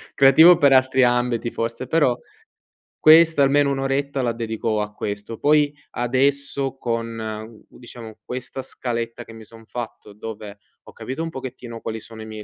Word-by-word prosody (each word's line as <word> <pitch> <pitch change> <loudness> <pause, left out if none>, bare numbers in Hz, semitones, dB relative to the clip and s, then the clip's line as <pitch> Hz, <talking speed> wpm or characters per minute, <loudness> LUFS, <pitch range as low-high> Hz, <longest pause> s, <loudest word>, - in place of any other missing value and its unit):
creativo 160 +6 +7
per 140 -4 +5
altri 130 0 +4
ambiti, 120 -1 +1
forse, 115 +2 -4
però 140 -6 +2 0.8
questo 160 -1 +6
almeno 140 +1 +3
un'oretta 135 0 -1
la 120 -2 0
dedico 110 -1 -2
a 105 0 -4
questo. 105 +2 -5
Poi, 150 0 +3 0.2
adesso, 135 +2 0
con, 115 -2 -3
uhm, 110 0 -7
diciamo, 115 -3 -12
questa 130 +1 -6
scaletta 115 -3 -5
che 115 - -13
mi 110 0 -12
son 115 +1 -14
fatto, 110 -3 -8
dove 105 -1 -8 0.3
ho - - -14
capito 135 +5 -6
un 165 - -3
pochettino 125 -5 -8
quali 110 0 -5
sono 110 -1 -11
i - - -8
miei 110 -1 -8
120 Hz, 160 wpm, -22 LUFS, 115-135 Hz, 0.8 s, creativo